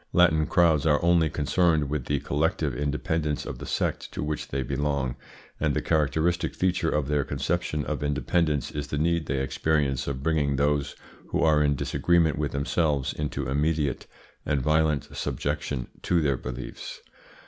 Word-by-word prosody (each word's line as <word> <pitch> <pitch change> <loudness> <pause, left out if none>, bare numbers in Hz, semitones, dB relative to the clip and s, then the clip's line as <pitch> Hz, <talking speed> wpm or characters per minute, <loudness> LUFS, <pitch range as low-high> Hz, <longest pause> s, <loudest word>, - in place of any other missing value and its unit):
Latin 80 -4 +4
crowds 80 -4 +3
are 75 -1 +4
only 85 -2 +4
concerned 80 0 +2
with 70 -3 -3
the 70 -1 0
collective 75 -1 0
independence 75 +2 -1
of - - -6
the - - -7
sect - - -2
to - - -3
which 75 0 -3
they 65 0 -2
belong, 70 -1 -1 0.4
and - - +1
the - - +1
characteristic 80 +3 +1
feature 90 -2 +1
of 75 -3 0
their 75 -1 +1
conception 75 -2 -2
of - - -3
independence 75 +1 0
is 75 -1 -4
the 70 - -3
need 85 +1 +1
they 70 -1 0
experience 70 0 0
of 70 -1 -3
bringing 75 -3 +1
those 70 0 0 0.3
who - - 0
are 75 -2 +4
in 70 -1 +3
disagreement 85 +1 +2
with 75 -1 -1
themselves 70 -1 0
into 70 -3 -3
immediate 75 0 0 0.4
and 70 -3 0
violent 75 -1 +2
subjection 70 -3 -2 0.2
to 90 - +2
their 70 -4 +2
beliefs. 65 0 -7
75 Hz, 160 wpm, -26 LUFS, 70-80 Hz, 0.4 s, Latin